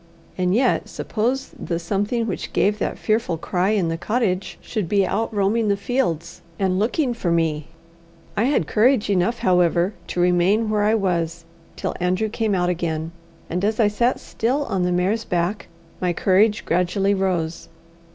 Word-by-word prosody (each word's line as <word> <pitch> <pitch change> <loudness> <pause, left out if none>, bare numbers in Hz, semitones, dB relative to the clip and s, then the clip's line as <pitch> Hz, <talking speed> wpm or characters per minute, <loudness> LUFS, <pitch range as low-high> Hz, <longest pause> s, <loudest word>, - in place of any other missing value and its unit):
And 180 +1 +1
yet 250 +1 +2
suppose 240 +5 -2
the 170 0 -2
something 205 +7 -1
which 200 -5 -4
gave 210 +2 +2
that - - -2
fearful 215 -6 0
cry 180 +3 0
in 200 -6 +1
the 165 0 -3
cottage 200 -3 -1
should 210 -8 -4
be 200 -2 +3
out 220 +5 -1
roaming 215 +2 +1
the 200 -1 +2
fields 175 - -2 0.2
and 190 -1 +1
looking 245 +4 +1
for 215 -6 -2
mel 165 -3 +1 0.7
I 215 - +2
had 270 - +2
courage 220 - +3
enough, 195 +5 +1
however, 180 0 +2
to - - -4
remain 180 +5 +3
where 210 -1 +1
I 215 +2 +3
was 170 -4 -1 0.3
till - - -3
Andrew 185 +4 0
came 220 -2 0
out 180 -1 +1
again, 165 -2 -2 0.4
and 180 +3 -3
as 215 +2 0
I 215 -2 +5
sat 235 +4 +1
still 265 +6 -1
on 190 - -1
the 180 0 +1
mare's 190 +6 +1
back, 180 +2 -1 0.3
my 180 -1 +1
courage 205 +5 +2
gradually 180 +3 +1
rose. 180 -4 -1
195 Hz, 170 wpm, -22 LUFS, 175-220 Hz, 0.7 s, I